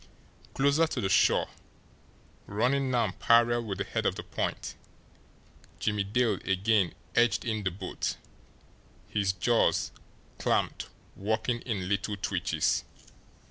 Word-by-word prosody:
Closer 140 +4 +3
to 140 - -3
the 95 -5 0
shore, - - +4 1.0
running 130 +6 +1
now 120 -5 +1
parallel 120 0 +4
with 100 -3 -3
the 100 - -1
head - - -1
of - - 0
the - - -6
point, - - -3 1.0
Jimmie 105 -1 0
Dale 110 0 +1
again 95 -1 +2 0.2
edged 120 +2 +3
in 110 -2 -1
the 95 - 0
boat, 95 +1 -4 0.9
his 100 -2 +1
jaws, 115 +5 +2 0.5
clamped, - - 0 0.3
working 110 +4 -1
in 100 -6 -2
little 100 +1 -1
twitches. 85 -6 0
110 Hz, 120 wpm, -29 LUFS, 95-120 Hz, 1.0 s, shore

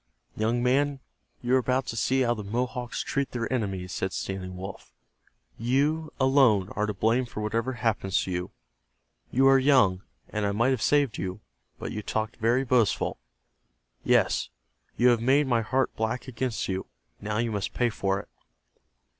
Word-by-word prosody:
"Young 115 +3 0
man, 140 +2 +2 0.4
you 120 +1 +1
are - - +5
about 130 +1 0
to 115 - -5
see 130 +4 +1
how 120 -2 +3
the 105 -3 -6
Mohawks 120 +3 -3
treat 140 -1 -1
their 120 +1 -2
enemies," 95 -6 -2
said 95 0 -2
Standing 90 -1 -4
Wolf. 95 +1 -8 0.7
"You, 145 +7 +1
alone, 130 -8 +4
are 105 0 -1
to 105 - -2
blame 115 +5 +1
for 105 - -6
whatever 115 +4 -1
happens 110 -5 0
to 95 - -5
you. 90 0 -3 0.8
You 135 +2 +3
are 135 0 +6
young, 130 -10 +4 0.3
and 105 -1 -2
I 100 0 +1
might 115 +5 +2
have 130 -4 0
saved 145 -4 +2
you. 95 +3 -4 0.4
But - - -5
you 105 - -4
talked 110 +1 -3
very 120 +4 +2
boastful. 120 -4 +1 0.8
Yes, - - +2 0.5
you 125 +1 +5
have 120 -2 +3
made 135 +5 +4
my 120 -3 +2
heart 130 +3 0
black 110 +4 -2
against 125 -1 -2
you. 95 0 -3 0.3
Now 105 +1 -3
you 115 0 0
must 100 -2 -3
pay 120 -1 +2
for 95 -1 -1
it." - - -21
115 Hz, 170 wpm, -27 LUFS, 105-130 Hz, 0.8 s, are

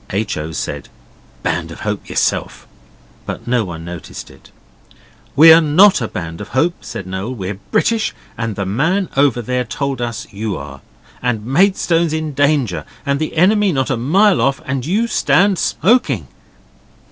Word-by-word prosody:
H. 100 +2 -2
O. 80 +1 -5
said, 80 - -5 0.5
'Band - - -1
of - - -10
Hope - - -4
yourself' - - -1 0.6
but - - -6
no 120 -1 +1
one 85 -4 -7
noticed 85 -1 -8
it. - - -18 0.9
'We're 160 +2 +9
NOT 170 +3 +5
a 115 - -1
Band 85 -3 -6
of 105 - -7
Hope,' 170 +6 +1
said 115 -5 -7
Noel. 95 +7 -4
'We're 95 -2 -5
British, 225 -1 +1 0.2
and 115 -2 -3
the 100 - -3
man 160 - 0
over 135 -3 +2
there 125 +2 -1
told 135 +3 -3
us 115 -1 -4
you 105 0 -4
are. 70 -1 -9 0.4
And 115 -4 -1
Maidstone's 170 - +2
in 155 -1 -3
danger, 145 - +1 0.2
and 140 0 0
the 155 +1 -4
enemy 205 +3 +4
not 135 -2 -1
a - - +2
mile 185 - +3
off, 135 0 +1
and 130 0 -3
you 210 +7 +1
stand 200 -4 +2
SMOKING. 155 - +1
135 Hz, 160 wpm, -17 LUFS, 105-165 Hz, 0.9 s, We're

